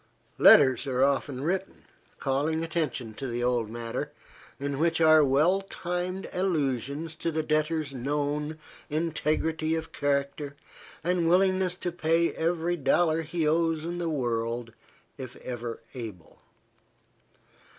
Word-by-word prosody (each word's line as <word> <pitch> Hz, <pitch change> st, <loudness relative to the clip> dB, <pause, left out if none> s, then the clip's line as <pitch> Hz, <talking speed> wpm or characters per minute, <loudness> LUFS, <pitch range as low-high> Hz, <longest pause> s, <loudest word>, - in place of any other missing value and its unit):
Letters 130 Hz, -1 st, +7 dB
are 130 Hz, 0 st, +2 dB
often 135 Hz, -1 st, 0 dB
written, 190 Hz, +4 st, -2 dB, 0.3 s
calling 145 Hz, +4 st, 0 dB
attention 150 Hz, -9 st, -2 dB
to 135 Hz, +5 st, -5 dB
the 120 Hz, 0 st, -2 dB
old 120 Hz, -3 st, +1 dB
matter, 115 Hz, 0 st, -4 dB, 0.5 s
in 140 Hz, 0 st, -3 dB
which 165 Hz, +1 st, +2 dB
are 155 Hz, -1 st, +7 dB
well 155 Hz, +8 st, +3 dB
timed 180 Hz, +2 st, -3 dB
allusions 150 Hz, -4 st, -1 dB
to 165 Hz, -, -1 dB
the 160 Hz, 0 st, -1 dB
debtor's 155 Hz, -1 st, 0 dB
known 145 Hz, +3 st, -2 dB, 0.3 s
integrity 160 Hz, 0 st, 0 dB
of 160 Hz, 0 st, -5 dB
character, 140 Hz, 0 st, -1 dB, 0.5 s
and 175 Hz, -1 st, +1 dB
willingness 185 Hz, 0 st, +3 dB
to 180 Hz, -1 st, -3 dB
pay 165 Hz, 0 st, +1 dB
every 170 Hz, +1 st, 0 dB
dollar 160 Hz, +2 st, +2 dB
he 160 Hz, 0 st, -1 dB
owes 165 Hz, 0 st, +1 dB
in 175 Hz, +1 st, -3 dB
the 170 Hz, -1 st, -1 dB
world, 120 Hz, -4 st, -2 dB, 0.5 s
if 130 Hz, -2 st, -7 dB
ever 120 Hz, -2 st, -6 dB
able. 110 Hz, -10 st, -8 dB
155 Hz, 125 wpm, -28 LUFS, 135-165 Hz, 0.5 s, Letters